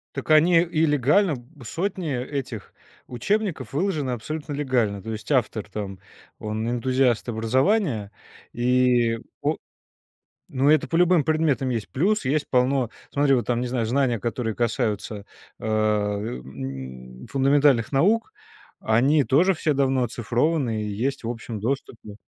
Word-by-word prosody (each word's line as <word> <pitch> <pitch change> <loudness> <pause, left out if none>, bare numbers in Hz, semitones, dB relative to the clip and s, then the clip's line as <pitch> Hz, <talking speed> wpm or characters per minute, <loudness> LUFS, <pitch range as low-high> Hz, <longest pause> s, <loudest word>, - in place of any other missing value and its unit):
Так, - - -3
они 165 +2 +6
и 165 -2 +1
легально 150 +5 +3 0.3
сотни 175 - -3
этих 125 -4 -5 0.3
учебников 150 - -2
выложены 150 -4 -1
абсолютно 145 +5 -5
легально. 120 -9 0
То 115 - -5
есть 110 +4 -6
автор 110 -6 0
там, 100 -2 -6 0.4
он- 110 +1 -3
энтузиаст 125 0 +1
образования, 120 - +1 0.4
и, 120 -1 +2 0.2
о - - +1 1.0
Ну, 135 +2 +2
это 155 -1 +4
по 165 - 0
любым 175 -1 +4
предметам 150 -4 +1
есть. 115 -5 -3
Плюс 200 +9 +1
есть 145 +2 +1
полно, 125 -1 +2 0.2
смотри, 140 -1 +3
вот 120 - 0
там, 120 -1 0
не 125 - -2
знаю, 120 -2 -1
знания, 125 0 +1
которые 115 +1 -3
касаются 110 -3 -2 0.4
а, 105 -1 +1
м, 65 - -7
фундаментальных 140 -3 +3
наук, 210 - +2 0.5
они 135 +7 +3
тоже 175 +10 +3
все 155 -1 0
давно 135 -1 +2
оцифрованы 120 +1 0
и 105 - -3 0.2
есть 135 -3 -2
в 115 - -2
общем 115 -2 -6
доступе. 115 -3 -4
125 Hz, 135 wpm, -24 LUFS, 110-145 Hz, 1.0 s, они